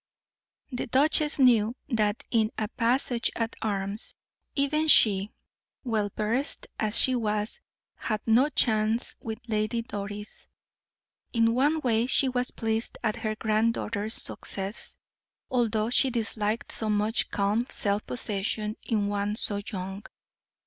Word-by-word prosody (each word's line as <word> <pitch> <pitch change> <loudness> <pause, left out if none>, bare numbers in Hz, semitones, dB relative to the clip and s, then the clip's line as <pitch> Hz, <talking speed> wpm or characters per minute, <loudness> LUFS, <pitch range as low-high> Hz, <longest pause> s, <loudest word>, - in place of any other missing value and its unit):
The 245 - -3
duchess 295 +4 +3
knew 240 -4 +4
that 215 -3 +1
in 220 -2 +3
a 215 -1 -1
passage 240 0 +1
at 230 0 -2
arms, 200 0 -2 0.4
even 305 +3 +1
she, 205 -7 +5 0.5
well 220 -5 0
versed 230 +7 0
as 215 0 +2
she 260 - +4
was, 210 -3 -1 0.4
had 215 -2 -2
no 240 +6 +4
chance 220 -3 +1
with 220 -1 -4
Lady 215 +1 0
Doris. 205 -1 -7 0.9
In 230 -1 +3
one 290 +6 +2
way 235 -2 +2
she 265 +1 +4
was 250 -1 0
pleased 225 0 -2
at 215 -2 0
her 215 -1 -2
granddaughter's 220 0 0
success, 195 +2 -4 0.5
although 230 -3 +1
she 265 +1 +4
disliked 220 -2 -2
so 220 - -2
much 210 +2 +1
calm 205 +3 +1
self 205 0 -1
possession 215 -1 -2
in 215 -3 0
one 205 0 -1
so 205 -2 0
young. 190 0 -5
220 Hz, 130 wpm, -27 LUFS, 210-240 Hz, 0.9 s, she